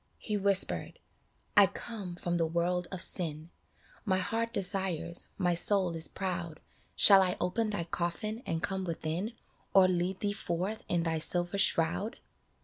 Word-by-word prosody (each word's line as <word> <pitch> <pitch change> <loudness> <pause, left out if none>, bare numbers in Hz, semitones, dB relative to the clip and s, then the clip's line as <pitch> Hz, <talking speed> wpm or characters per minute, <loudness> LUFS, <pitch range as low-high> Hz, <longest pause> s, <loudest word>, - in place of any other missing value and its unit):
He 210 - -3
whispered, 200 -1 +2 0.3
" - - -43 0.2
I - - +8
come 200 -7 -6
from 175 0 -2
the 165 -1 +1
world 175 +2 0
of 185 -2 -2
sin; 160 -2 -3 0.5
My 190 -4 +1
heart 225 +5 -1
desires, 185 -5 -2
my 180 -2 +1
soul 180 0 +1
is 160 0 +1
proud; 175 -4 -4 0.4
Shall 195 -2 +8
I 180 -1 0
open 215 +5 0
thy 205 -5 -2
coffin 175 +7 -3
and 165 0 -2
come 190 -1 -1
within, 170 +5 -3 0.4
Or 190 -1 +8
lead 180 +1 -1
thee 205 -1 0
forth 190 +2 -3
in 175 -1 +1
thy 165 -1 -1
silver 175 +4 -1
shroud 190 +6 +2
180 Hz, 155 wpm, -31 LUFS, 170-200 Hz, 0.5 s, I